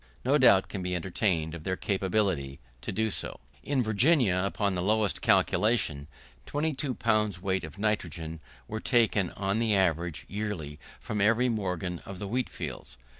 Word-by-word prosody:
No 140 +4 +4
doubt 100 -7 +6
can 100 - -5
be 90 0 -2
entertained 85 -2 0
of 85 -2 -7
their 95 +2 -1
capability 95 -9 -1 0.2
to - - -4
do 110 0 0
so. - - -4 0.2
In 140 -3 0
Virginia, 110 - +3
upon 100 0 0
the 90 - -1
lowest 105 +1 +1
calculation, 90 -8 +2 0.4
22 145 -3 -1
pounds 105 -4 +1
weight 95 0 -1
of 80 +4 -8
nitrogen 85 -6 -2 0.3
were 110 - -4
taken 110 -6 +2
on 100 +2 -1
the 110 -3 +2
average, 85 -3 0
yearly, 95 -8 -4 0.2
from 105 -1 -3
every 115 +4 +4
morgen 90 -5 -2
of 100 - -9
the 100 +1 -5
wheat 125 +5 -1
fields. 75 -8 -7
100 Hz, 160 wpm, -29 LUFS, 90-110 Hz, 0.4 s, doubt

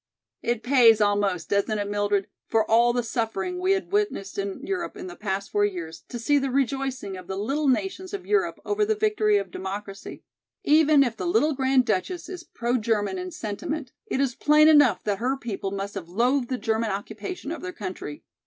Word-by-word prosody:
"It 235 -1 -1
pays 245 -4 +6
almost, 205 -4 +1
doesn't 200 +2 +1
it, 205 -1 -2
Mildred, 205 -1 0 0.2
for 220 -1 +2
all 235 +2 +4
the 245 0 0
suffering 230 - -2
we 370 +1 +3
have 385 -1 -3
witnessed 405 - -1
in 200 +8 -4
Europe 370 0 -3
in 365 - -7
the 360 - -8
past 200 -1 -3
four 205 - +2
years 170 -5 -3
to 245 - -5
see 285 +5 +2
the 275 0 -1
rejoicing 265 -5 -1
of 185 -1 -10
the 190 0 -4
little 275 +9 -1
nations 370 +7 0
of 400 -2 -6
Europe 420 0 +1
over 415 +1 +1
the 435 +1 +1
victory 425 0 +2
of 405 - -3
democracy? 195 +1 -7 0.4
Even 305 -1 +5
if 240 -4 -2
the 290 - -4
little 330 -4 +3
Grand 265 -1 +2
Duchess 225 - -2
is 360 -2 -7
pro 240 -5 -1
German 220 - 0
in 365 0 -5
sentiment, 280 - -5 0.2
it - - -1
is 270 -3 +1
plain 300 +4 +5
enough 290 -10 +5
that 205 -2 -1
her 260 +3 0
people 210 -6 -4
must 200 +1 -4
have 180 -4 -7
loathed 245 +6 +1
the 255 - -1
German 225 -1 0
occupation 215 - -5
of 335 - -5
their 365 - -5
country. 185 - -7
240 Hz, 200 wpm, -25 LUFS, 205-310 Hz, 0.4 s, pays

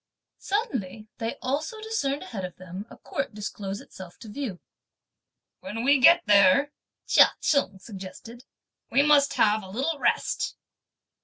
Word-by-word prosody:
Suddenly 225 - -3
they 225 0 -3
also 300 - -2
discerned 430 -11 -2
ahead 200 -5 -6
of 180 -1 -6
them 185 +3 -9
a - - -13
court 275 -6 -5
disclose 200 -1 -5
itself 180 -2 -12
to 225 - -11
view. 210 -6 -5 1.0
"When 230 -5 -5
we 280 +2 +4
get 335 +7 +7
there," 205 +7 +5 0.3
Chia - - +5
Cheng 280 -9 +1
suggested, 195 +4 -10 0.5
"we 280 - +4
must 290 -1 +4
have 215 0 +3
a 190 - -11
little 275 +9 -2
rest." - - 0
230 Hz, 140 wpm, -26 LUFS, 195-280 Hz, 1.0 s, get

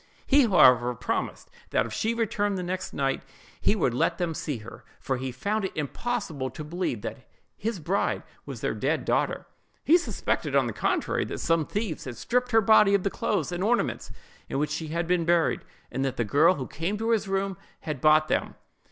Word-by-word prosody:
He, 280 -3 +5
however, 125 - +5
promised - - -3 0.2
that - - +2
if 115 - -7
she 225 - 0
returned 205 -3 0
the 180 - -3
next 185 +1 -3
night, 135 -1 -1 0.4
he - - +3
would 160 - +1
let 165 +6 +1
them 175 -2 -1
see 145 -3 -3
her; 110 +1 -11 0.2
for 130 -1 -2
he 130 +1 -4
found 200 - -2
it 190 - -6
impossible 155 - -3
to 145 +5 -8
believe 150 - -3
that - - -7 0.3
his 220 -2 -3
bride 180 +6 0 0.2
was - - -8
their - - 0
dead - - -1
daughter. - - 0 0.4
He 340 +4 +6
suspected, 340 - -2
on - - +4
the - - -3
contrary, - - 0
that - - -5
some 165 -2 +1
thieves 205 -6 -3
had 125 -3 -6
stripped 250 +1 0
her 225 -2 +5
body 215 -2 +6
of 195 - +1
the 200 - 0
clothes - - -1
and 175 +1 -2
ornaments 235 +3 0 0.4
in - - -2
which 150 +1 0
she 155 +1 -3
had 170 +2 -2
been 175 0 +1
buried, 170 0 +2 0.3
and 135 +2 -1
that 135 -2 -2
the 115 - +1
girl 155 - +4
who 130 - -4
came 170 +10 -3
to 225 +2 -1
his 220 -3 +1
room 195 0 -1 0.3
had 150 -5 -4
bought 155 0 +5
them. - - -1
175 Hz, 205 wpm, -27 LUFS, 145-205 Hz, 0.4 s, He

